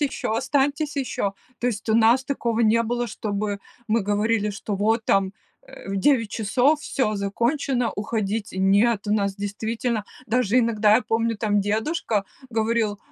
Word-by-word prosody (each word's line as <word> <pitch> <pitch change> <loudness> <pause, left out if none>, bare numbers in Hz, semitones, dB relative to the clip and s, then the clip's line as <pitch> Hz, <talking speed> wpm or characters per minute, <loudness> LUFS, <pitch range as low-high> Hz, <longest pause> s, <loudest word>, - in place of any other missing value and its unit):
еще, 275 -6 -1
останьтесь 285 +4 0
еще!" 205 -7 -2 0.3
То 245 - 0
есть 220 -2 -3
у - - +3
нас 230 +3 +4
такого 235 -5 -1
не 230 +1 +4
было, 240 +1 -1
чтобы 205 -2 -3 0.3
мы 230 +1 +2
говорили, 210 +1 +1
что 205 0 -4
"вот 220 +3 +1
там, 195 -1 +2 0.3
э, - - -13
в 195 - -2
9 230 -3 +2
часов 255 +8 +2
всё 215 -9 -1
закончено, 240 +5 0
уходите". 210 -1 -3
Нет, 205 +3 +3
у 210 - +1
нас 200 -2 +1
действительно 220 +2 -2 0.2
даже 245 0 +2
иногда, 215 -3 +3
я 240 - +3
помню 230 0 0
там 205 -2 +1
дедушка 215 +1 -1 0.2
говорил: 220 -2 0
220 Hz, 155 wpm, -24 LUFS, 205-240 Hz, 0.3 s, нас